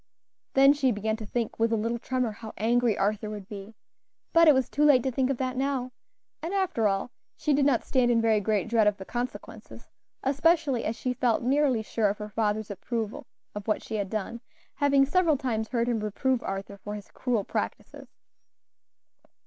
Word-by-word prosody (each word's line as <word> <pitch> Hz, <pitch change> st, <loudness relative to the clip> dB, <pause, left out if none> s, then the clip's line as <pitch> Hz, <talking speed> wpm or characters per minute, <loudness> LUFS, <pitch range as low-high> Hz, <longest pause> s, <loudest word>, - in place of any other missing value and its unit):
Then 275 Hz, +1 st, +7 dB
she 275 Hz, -3 st, +1 dB
began 220 Hz, 0 st, -1 dB
to 220 Hz, -2 st, -8 dB
think 230 Hz, 0 st, -3 dB
with 230 Hz, 0 st, +2 dB
a -, -, +3 dB
little 230 Hz, +2 st, -1 dB
tremor, 255 Hz, -1 st, -1 dB
how 220 Hz, +1 st, -9 dB
angry 235 Hz, +1 st, +2 dB
Arthur 210 Hz, +1 st, 0 dB
would 205 Hz, -2 st, -7 dB
be; 205 Hz, +1 st, -9 dB, 0.6 s
but 335 Hz, 0 st, +6 dB
it 305 Hz, -, +9 dB
was 260 Hz, -2 st, +1 dB
too 295 Hz, -, 0 dB
late 280 Hz, -5 st, +6 dB
to 265 Hz, -, 0 dB
think 260 Hz, +1 st, 0 dB
of 275 Hz, -, 0 dB
that 255 Hz, 0 st, -2 dB
now, 265 Hz, -1 st, -1 dB, 0.5 s
and, 340 Hz, +5 st, -3 dB
after 360 Hz, -, +1 dB
all, 195 Hz, +4 st, -1 dB, 0.3 s
she 300 Hz, -, +1 dB
did 280 Hz, 0 st, +3 dB
not 255 Hz, -5 st, +2 dB
stand 255 Hz, -2 st, +2 dB
in 235 Hz, -1 st, +3 dB
very 225 Hz, -1 st, +3 dB
great 205 Hz, -1 st, 0 dB
dread 225 Hz, -2 st, +3 dB
of 210 Hz, -1 st, +2 dB
the 190 Hz, -, -8 dB
consequences, 245 Hz, +4 st, -6 dB, 0.3 s
especially 285 Hz, -1 st, +2 dB
as 220 Hz, -, -1 dB
she 250 Hz, +2 st, -2 dB
felt 245 Hz, -2 st, +1 dB
nearly 265 Hz, -3 st, +2 dB
sure 215 Hz, -1 st, 0 dB
of 205 Hz, -, -3 dB
her 210 Hz, 0 st, -6 dB
father's 215 Hz, 0 st, -1 dB
approval 220 Hz, +2 st, -4 dB, 0.3 s
of 205 Hz, 0 st, -7 dB
what 215 Hz, -, 0 dB
she 220 Hz, -, -4 dB
had 200 Hz, -2 st, -2 dB
done, 220 Hz, +2 st, -4 dB, 0.3 s
having 280 Hz, -1 st, +3 dB
several 325 Hz, 0 st, +2 dB
times 230 Hz, -5 st, -2 dB
heard 235 Hz, -1 st, -1 dB
him 235 Hz, -2 st, 0 dB
reprove 230 Hz, +5 st, 0 dB
Arthur 195 Hz, +1 st, -5 dB
for 205 Hz, +1 st, -6 dB
his 205 Hz, -1 st, -10 dB
cruel 240 Hz, -5 st, -1 dB
practices. -, -, -5 dB
235 Hz, 195 wpm, -27 LUFS, 215-265 Hz, 0.6 s, it